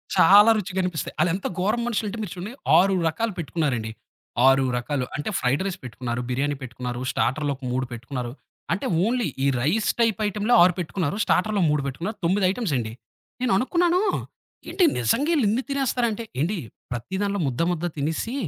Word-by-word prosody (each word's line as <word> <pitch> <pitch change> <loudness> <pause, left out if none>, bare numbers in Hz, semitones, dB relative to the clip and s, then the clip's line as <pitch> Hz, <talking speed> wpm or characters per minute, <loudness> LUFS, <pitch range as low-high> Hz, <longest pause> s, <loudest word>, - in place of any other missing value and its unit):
చాలా 205 +6 +8
రుచిగనిపిస్తాయి. 180 -4 -3
ఆలెంత 180 +2 0
ఘోరం 215 +6 +1
మనుషులు 220 -2 -1
అంటే 230 - -6
మీరు 205 -6 -5
చూడండి, 190 +6 -6 0.2
6 195 +2 +4
రకాలు 225 +7 -1
పెట్టుకున్నారండి. 140 -9 -2 0.6
6 135 0 +5
రకాలు 125 +1 -2
అంటే 145 +6 -3
ఫ్రైడ్ 130 +6 +1
రైస్ 190 -2 -3
పెట్టుకున్నారు, 125 -1 -4
బిర్యానీ 140 +3 0
పెట్టుకున్నారు, 125 -1 -5
స్టార్టర్లు 145 +3 0
ఒక 135 - -18
3 130 +1 0
పెట్టుకున్నారు. 120 +1 -5 0.4
అంటే 190 - -3 0.2
ఓన్లీ 240 -1 0 0.2
ఈ 140 - +3
రైస్ 195 - +1
టైప్ 225 -2 +2
ఐటెమ్‌లే 210 +3 0
6 180 0 +5
పెట్టుకున్నారు. 175 -1 -2
స్టార్టర్లు 215 -2 +1
ఓ - - +4
3 150 -1 +1
పెట్టుకున్నారు. 175 - -4
9 190 +3 +2
ఐటెమ్సండి. 145 - -2 0.5
నేననుకున్నాను, 340 - +2 0.7
ఏంటి 380 - +1 0.2
నిజంగా 270 - +1
ఈళ్ళిన్ని 235 -1 +2
తినేస్తారా 265 -3 +1
అంటే 230 +2 -4 0.2
ఏండి 180 +8 0 0.3
ప్రతి 120 +10 -4
దాంట్లో 200 0 0
ముద్ద, 125 +3 -2
ముద్ద 175 0 -2
తినేసి 160 - -2
180 Hz, 160 wpm, -24 LUFS, 135-215 Hz, 0.7 s, చాలా